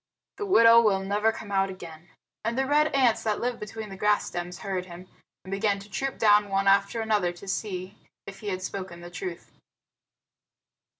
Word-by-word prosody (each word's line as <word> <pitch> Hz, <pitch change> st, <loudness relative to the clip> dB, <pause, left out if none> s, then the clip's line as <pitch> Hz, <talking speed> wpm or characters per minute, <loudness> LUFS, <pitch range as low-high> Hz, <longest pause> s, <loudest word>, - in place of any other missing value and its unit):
"The 415 Hz, -, -4 dB
widow 230 Hz, -9 st, +7 dB
will 200 Hz, -4 st, +2 dB
never 205 Hz, +3 st, +1 dB
come 215 Hz, -2 st, -9 dB
out 195 Hz, 0 st, +2 dB
again." 170 Hz, -2 st, -10 dB, 0.3 s
And 230 Hz, +2 st, -2 dB
the 265 Hz, -, +2 dB
red 300 Hz, +2 st, +3 dB
ants 260 Hz, -6 st, +2 dB
that 215 Hz, -2 st, -1 dB
live 245 Hz, 0 st, -2 dB
between 215 Hz, +1 st, -7 dB
the 195 Hz, -, -8 dB
grass 210 Hz, +2 st, +2 dB
stems 175 Hz, +1 st, -5 dB
heard 185 Hz, -2 st, -3 dB
him, 175 Hz, +1 st, -11 dB, 0.4 s
and 190 Hz, -, -10 dB
began 200 Hz, 0 st, +1 dB
to 200 Hz, +1 st, -11 dB
troop 270 Hz, +7 st, -3 dB
down 210 Hz, -1 st, +4 dB
one 195 Hz, 0 st, 0 dB
after 200 Hz, +3 st, +3 dB
another 210 Hz, -5 st, +1 dB
to 175 Hz, +3 st, -13 dB
see 190 Hz, -1 st, -4 dB, 0.3 s
if 195 Hz, -1 st, -10 dB
he 210 Hz, -, -8 dB
had 185 Hz, -1 st, -3 dB
spoken 185 Hz, -3 st, -6 dB
the 175 Hz, 0 st, -10 dB
truth. 375 Hz, -, -7 dB
200 Hz, 190 wpm, -26 LUFS, 190-225 Hz, 0.4 s, widow